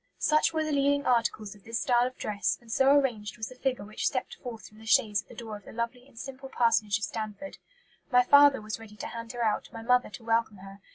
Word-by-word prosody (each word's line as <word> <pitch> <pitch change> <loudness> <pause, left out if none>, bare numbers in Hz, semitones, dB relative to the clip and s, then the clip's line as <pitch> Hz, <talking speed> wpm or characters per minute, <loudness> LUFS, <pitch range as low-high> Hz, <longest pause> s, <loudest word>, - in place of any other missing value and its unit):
"Such 305 0 +3
were 315 -1 0
the 310 - -2
leading 285 0 +2
articles 230 -4 +1
of 205 -2 -19
this 230 0 -3
style 245 -1 +3
of 255 - -9
dress, 200 -3 -1
and 235 -2 -13
so 265 +3 +4
arranged 245 -7 +2
was 220 - -4
the 255 - -12
figure 250 -5 -2
which 215 +1 -2
stepped - - -2
forth 240 -4 -8
from 215 - -18
the 220 - -13
chaise 210 -2 +3
at 195 - -29
the - - -13
door 220 -3 -7
of 205 - -19
the - - -10
lovely 235 +2 -4
and 265 -5 -22
simple 270 +2 -8
parsonage 225 -5 +2
of 220 - -9
Stanford. 215 +7 -5 0.5
My 250 -1 +6
father 285 -1 +6
was 215 +1 -5
ready 220 -2 -12
to 210 - -7
hand 230 0 -6
her 240 -1 -2
out, 215 - -1
my 225 - -8
mother 250 +1 +3
to 250 - -10
welcome 225 -2 0
her. 195 +1 -12
230 Hz, 250 wpm, -28 LUFS, 215-260 Hz, 0.5 s, My